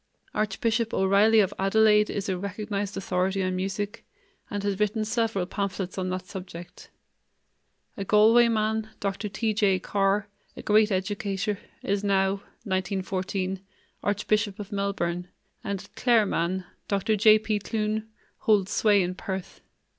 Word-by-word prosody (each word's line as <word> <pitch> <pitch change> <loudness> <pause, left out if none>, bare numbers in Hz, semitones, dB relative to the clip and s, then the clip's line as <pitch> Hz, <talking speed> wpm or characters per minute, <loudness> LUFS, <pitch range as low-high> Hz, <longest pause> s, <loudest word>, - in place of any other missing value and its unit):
Archbishop 220 +2 0
O'Reily 205 +3 +5
of 190 - 0
Adelaide 210 +2 +4
is 200 - -3
a 190 - 0
recognized 200 +1 -4
authority 190 +1 0
on 185 0 -1
music, 195 +3 -3 0.5
and 205 -1 -3
has 200 -1 -1
written 215 +1 +1
several 220 -4 0
pamphlets 195 -1 -3
on 185 -1 -2
that 185 0 -3
subject. 180 -3 -9 1.1
A 200 - -4
Galway 215 +4 +6
man, 220 -1 0
Dr. 200 +1 -2
T. 215 +3 -1
J. 200 -3 +3
Carr, 195 +2 0 0.3
a - - -7
great 215 0 +4
educator, 195 +1 -1 0.2
is 200 +1 -1
now 195 -1 +2 0.3
(1914) 190 -1 -2 0.4
archbishop 205 0 0
of 205 -1 -8
Melbourne, 195 -3 -2 0.4
and 200 -1 -3
a 205 +2 -14
Clare 235 -4 +5
man, 180 +1 -1 0.2
Dr. 200 +2 +1
J. 215 +1 +7
P. 215 -1 -1
Clune, 215 +1 -2 0.3
holds 205 -2 +2
sway 205 -3 +4
in 180 +1 -2
Perth. 190 -1 -6
200 Hz, 140 wpm, -26 LUFS, 190-215 Hz, 1.1 s, J